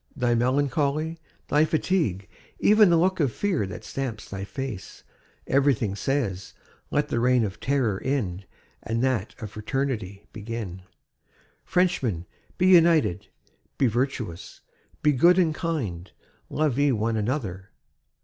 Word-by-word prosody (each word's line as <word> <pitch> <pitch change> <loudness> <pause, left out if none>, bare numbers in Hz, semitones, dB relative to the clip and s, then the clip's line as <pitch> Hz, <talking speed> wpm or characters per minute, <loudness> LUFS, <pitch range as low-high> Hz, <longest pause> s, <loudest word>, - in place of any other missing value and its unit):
Thy 125 -4 +1
melancholy, 145 +6 0 0.3
thy 150 +1 +4
fatigue, 155 - 0 0.3
even 210 -1 +5
the 170 - +5
look 185 +3 +2
of 140 -6 +2
fear 180 - -1
that 95 - -8
stamps 125 -6 -5
thy 95 0 -6
face, 130 -2 -6 0.4
everything 130 -7 +2
says: 105 -6 -2 0.3
'Let - - 0
the 120 - 0
reign 125 0 +3
of 100 -2 -4
terror 130 -8 0
end 100 -9 -2 0.3
and 115 +3 -2
that 130 -4 0
of 110 -4 -7
fraternity 105 -4 -3
begin! 105 -4 -6 0.8
Frenchmen, 135 - 0 0.3
be 185 - +2
united, 165 - +4 0.5
be - - +3
virtuous, 120 -7 -2 0.4
be 150 - +5
good 170 +7 +5
and 170 -4 +3
kind. 125 - -3 0.4
Love 150 -4 0
ye 145 -1 +4
one 115 -1 0
another....' 105 -5 -3
125 Hz, 130 wpm, -25 LUFS, 105-150 Hz, 0.8 s, even